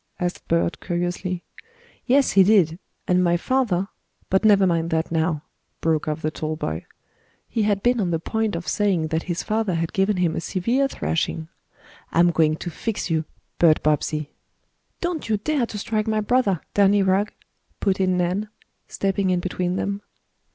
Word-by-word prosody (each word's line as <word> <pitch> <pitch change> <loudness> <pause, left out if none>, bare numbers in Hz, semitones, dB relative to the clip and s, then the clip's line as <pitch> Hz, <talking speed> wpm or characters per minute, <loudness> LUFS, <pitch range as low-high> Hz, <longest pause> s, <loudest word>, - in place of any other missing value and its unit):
asked 175 0 -3
Bert 170 +1 +1
curiously. 175 0 -2 0.6
"Yes, 270 +2 +4
he 195 - +6
did. 185 -5 +4 0.3
And 180 0 +3
my 175 -1 +3
father 200 -4 0 0.4
but 190 +2 +3
never 200 -3 +6
mind 165 -2 +1
that 160 0 -1
now," 160 -2 0 0.4
broke 160 -2 0
off 155 +1 -3
the 155 - 0
tall 155 0 -3
boy. 80 - -4 0.6
He 225 - -1
had 200 -1 0
been 245 0 +3
on 185 - 0
the 165 - +1
point 220 +4 -1
of 170 +1 -5
saying 185 -7 +1
that 160 +1 0
his 170 -1 -1
father 215 -4 0
had 165 0 -2
given 195 +1 +2
him 175 -3 +1
a - - -2
severe 235 +11 +1
thrashing. 165 -8 -2 0.6
"I'm 175 +1 +4
going 155 -1 +3
to 175 +2 -6
fix 210 -1 -3
you, 160 -1 +1 0.3
Bert 160 -3 +5
Bobbsey." 150 0 0 0.7
"Don't 345 -8 -2
you 215 - +2
dare 255 +3 0
to 210 - -6
strike 215 +1 -1
my 215 -1 +1
brother, 210 -5 +1
Danny 200 0 +4
Rugg!" 195 +2 +2 0.5
put 195 -1 +1
in 185 -1 +2
Nan, 180 +4 -1 0.4
stepping 195 -1 0
in 180 -1 +2
between 180 0 -2
them. 200 +1 -2
185 Hz, 170 wpm, -23 LUFS, 165-210 Hz, 0.7 s, he